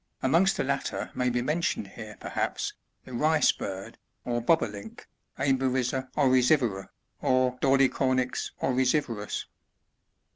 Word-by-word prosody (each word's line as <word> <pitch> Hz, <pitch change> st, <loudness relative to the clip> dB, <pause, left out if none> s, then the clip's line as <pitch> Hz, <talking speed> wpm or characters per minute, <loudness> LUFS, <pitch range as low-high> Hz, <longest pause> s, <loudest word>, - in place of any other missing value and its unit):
Amongst 170 Hz, +9 st, +3 dB
the -, -, +1 dB
latter 140 Hz, 0 st, -2 dB
may 125 Hz, 0 st, 0 dB
be 120 Hz, 0 st, 0 dB
mentioned 150 Hz, -, -1 dB
here, 110 Hz, 0 st, -10 dB
perhaps, -, -, -2 dB, 0.3 s
the 130 Hz, -, -10 dB
Rice 155 Hz, +5 st, +3 dB
Bird, 95 Hz, -1 st, -7 dB, 0.3 s
or 120 Hz, -1 st, -1 dB
Bob 160 Hz, +7 st, +3 dB
o -, -, +1 dB
Link, 100 Hz, -2 st, -10 dB, 0.2 s
— -, -, -43 dB
Emberiza 130 Hz, -1 st, 0 dB
oryzivora, 130 Hz, -7 st, +3 dB, 0.3 s
or 130 Hz, -1 st, +2 dB
Dolichonyx 130 Hz, -1 st, +2 dB
oryzivorus. 125 Hz, -4 st, 0 dB
130 Hz, 120 wpm, -28 LUFS, 120-135 Hz, 0.3 s, Amongst